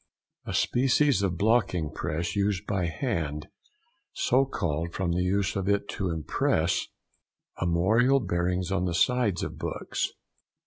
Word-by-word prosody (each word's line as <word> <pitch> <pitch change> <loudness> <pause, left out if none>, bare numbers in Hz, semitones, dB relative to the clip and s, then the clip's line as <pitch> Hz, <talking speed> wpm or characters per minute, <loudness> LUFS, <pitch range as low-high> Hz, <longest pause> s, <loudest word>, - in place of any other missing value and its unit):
—A - - -3
species 135 0 +3
of 95 -3 0
blocking 100 -7 +1
press 85 +4 -3
used 100 -1 0
by 95 -5 -1
hand; 80 - -3 0.6
so 360 - +2
called 85 - -2
from 95 -2 -1
the 90 +1 0
use 95 +2 0
of 95 0 -1
it 100 0 +1
to 95 -2 -2
impress 80 +1 0 0.7
armorial 110 +11 +3
bearings 90 -3 -1
on 95 -2 +1
the 85 -2 -1
sides 110 -2 +2
of - - -5
books. - - -2
95 Hz, 135 wpm, -27 LUFS, 85-110 Hz, 0.7 s, species